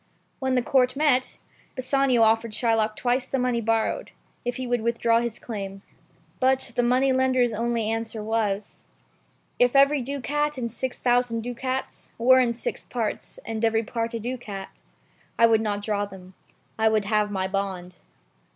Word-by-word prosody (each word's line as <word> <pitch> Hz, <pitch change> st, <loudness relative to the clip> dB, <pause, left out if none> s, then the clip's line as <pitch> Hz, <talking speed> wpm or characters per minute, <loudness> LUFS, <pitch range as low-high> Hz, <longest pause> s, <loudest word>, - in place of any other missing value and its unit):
When 260 Hz, -1 st, 0 dB
the 250 Hz, -, +2 dB
Court 255 Hz, 0 st, +2 dB
met, 270 Hz, -3 st, +2 dB, 0.4 s
Bassanio 255 Hz, -2 st, +2 dB
offered 225 Hz, 0 st, +2 dB
Shylock 220 Hz, -2 st, +1 dB
twice 245 Hz, +2 st, 0 dB
the 270 Hz, -, -1 dB
money 250 Hz, -2 st, 0 dB
borrowed, 225 Hz, 0 st, 0 dB, 0.3 s
if 245 Hz, 0 st, -2 dB
he 255 Hz, -, -4 dB
would 245 Hz, -1 st, 0 dB
withdraw 230 Hz, 0 st, +2 dB
his 235 Hz, -2 st, -3 dB
claim. 195 Hz, -3 st, -6 dB, 0.6 s
But 260 Hz, 0 st, +2 dB
the 245 Hz, -, +3 dB, 0.5 s
Jew's 245 Hz, -3 st, +2 dB
only 230 Hz, 0 st, -1 dB
answer 225 Hz, -1 st, -3 dB
was 215 Hz, -2 st, -2 dB, 0.4 s
— -, -, -40 dB
"If 245 Hz, +2 st, +3 dB
every 275 Hz, +1 st, +5 dB
ducat 285 Hz, +3 st, -2 dB
in 235 Hz, -2 st, -2 dB
six 250 Hz, +2 st, -3 dB
thousand 245 Hz, -2 st, +1 dB
ducats 255 Hz, +2 st, -4 dB
Were 260 Hz, +3 st, +6 dB
in 240 Hz, -2 st, +2 dB
six 235 Hz, -, -4 dB
parts, 230 Hz, -4 st, -4 dB
and 225 Hz, 0 st, -4 dB
every 225 Hz, 0 st, +2 dB
part 230 Hz, +1 st, -3 dB
a -, -, -2 dB
ducat, 220 Hz, -5 st, -6 dB, 0.6 s
I 230 Hz, -, +6 dB
would 225 Hz, -1 st, +4 dB
not 205 Hz, -2 st, -2 dB
draw 205 Hz, -1 st, 0 dB
them, 190 Hz, -1 st, -13 dB, 0.2 s
— -, -, -37 dB
I 220 Hz, 0 st, +4 dB
would 215 Hz, -2 st, +1 dB
have 210 Hz, 0 st, +1 dB
my 190 Hz, -2 st, -1 dB
bond." 190 Hz, -2 st, -4 dB
230 Hz, 165 wpm, -25 LUFS, 215-250 Hz, 0.6 s, Were